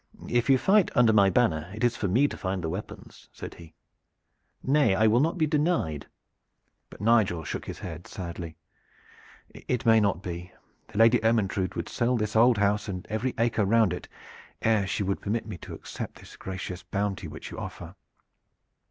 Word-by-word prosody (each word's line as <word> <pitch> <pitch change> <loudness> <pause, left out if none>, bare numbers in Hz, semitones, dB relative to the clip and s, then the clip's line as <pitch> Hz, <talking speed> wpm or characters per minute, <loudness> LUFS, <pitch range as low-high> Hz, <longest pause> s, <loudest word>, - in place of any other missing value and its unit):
"If 120 +2 +1
you 135 - +6
fight 195 +7 +4
under 120 -4 +5
my 100 -2 +5
banner 85 -6 +1
it 110 - -5
is 120 -1 +3
for 105 - -2
me 125 +10 +3
to - - -6
find 95 -1 -3
the 80 - -1
weapons," 95 +6 -8
said - - -8
he. 80 -2 -14 0.9
"Nay, 140 -7 +3
I 110 +3 +3
will 110 +2 +4
not 165 +6 +1
be 160 - +3
denied." 150 - 0 0.8
But - - -13
Nigel 105 -7 +3
shook - - -5
his - - -6
head 85 -1 -8
sadly. 85 -3 -7 1.0
"It 125 - -3
may 115 -1 +6
not 100 -3 0
be. 90 +1 -6 0.3
The - - -10
Lady 115 +2 +6
Ermyntrude 100 -5 +1
would - - -3
sell 120 +1 0
this 105 -1 -2
old 120 +1 +5
house 105 +1 +1
and 90 -3 -5
every 120 +4 -1
acre 115 -2 +1
round 110 -2 +3
it, 90 - -7 0.6
ere 110 -3 +2
she 100 - -1
would 100 0 -2
permit 110 +2 -2
me 105 -6 -7
to - - -8
accept - - -7
this - - -14
gracious 95 -1 -6
bounty 100 -1 -3
which - - -9
you - - -7
offer. - - -7
105 Hz, 185 wpm, -27 LUFS, 95-120 Hz, 1.0 s, you